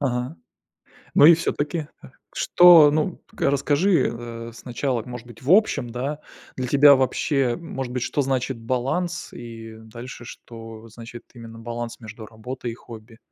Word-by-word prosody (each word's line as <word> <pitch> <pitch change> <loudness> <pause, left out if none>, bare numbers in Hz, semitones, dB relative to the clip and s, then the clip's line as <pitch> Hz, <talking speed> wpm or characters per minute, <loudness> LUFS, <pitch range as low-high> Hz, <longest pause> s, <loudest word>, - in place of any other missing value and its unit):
Ага. 125 +2 -2 0.8
Ну 145 - +7
и 170 - +9
всё-таки, 155 -1 -3 0.5
что 170 -4 +7
ну, 155 +4 -1
к - - -15
расскажи, 145 +7 +2
э, 115 0 -8
сначала, 125 0 -3
может 125 -1 -9
быть, 120 +1 -14
в 135 - -3
общем, 175 - +3
да, 135 +5 -4 0.4
для 130 - -3
тебя 140 +2 +7
вообще, 130 -1 0
может 135 -7 -6
быть, 125 - -3
что 145 - -1
значит 130 -2 -2
баланс 130 +10 -3
и 115 -2 -10
дальше, 120 +2 -10
что 115 -1 -11
значит 115 +1 -11
именно 115 -1 -11
баланс 120 0 -6
между 110 -1 -10
работой 120 +3 -7
и 115 - -7
хобби? 115 -1 -13
125 Hz, 150 wpm, -23 LUFS, 115-145 Hz, 0.8 s, и